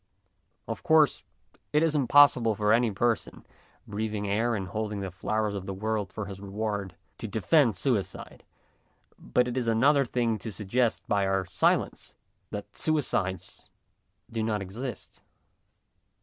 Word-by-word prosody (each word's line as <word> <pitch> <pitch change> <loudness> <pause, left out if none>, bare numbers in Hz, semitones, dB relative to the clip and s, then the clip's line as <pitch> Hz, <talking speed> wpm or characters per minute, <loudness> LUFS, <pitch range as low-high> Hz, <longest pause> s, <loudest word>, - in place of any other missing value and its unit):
Of - - -4
course, 155 -2 +4 0.5
it 150 +1 +3
is 165 -2 +2
impossible 135 -5 +5
for 105 +1 +2
any 120 0 +3
person, 115 +3 -1 0.4
breathing 105 0 -3
air 115 +4 +1
and 95 -3 -4
holding 105 0 -3
the 95 -1 -4
flowers 105 +3 -1
of 95 -2 -5
the 95 - -4
world 105 -1 -2
for 110 - -5
his 100 -1 -8
reward, 100 -1 -4 0.2
to - - -4
defend 115 - +3
suicide, 105 +1 -2 0.8
but 125 0 +1
it 125 - -3
is 125 -3 -1
another 135 +6 +4
thing 120 -3 -1
to 110 - -6
suggest 110 +5 0
by 100 -1 +1
our 95 -1 0
silence 90 - 0 0.3
that 105 0 -7
suicides 105 - -1 0.6
do 115 -1 -2
not 110 -1 0
exist. 105 +4 -7
110 Hz, 140 wpm, -28 LUFS, 100-120 Hz, 0.8 s, impossible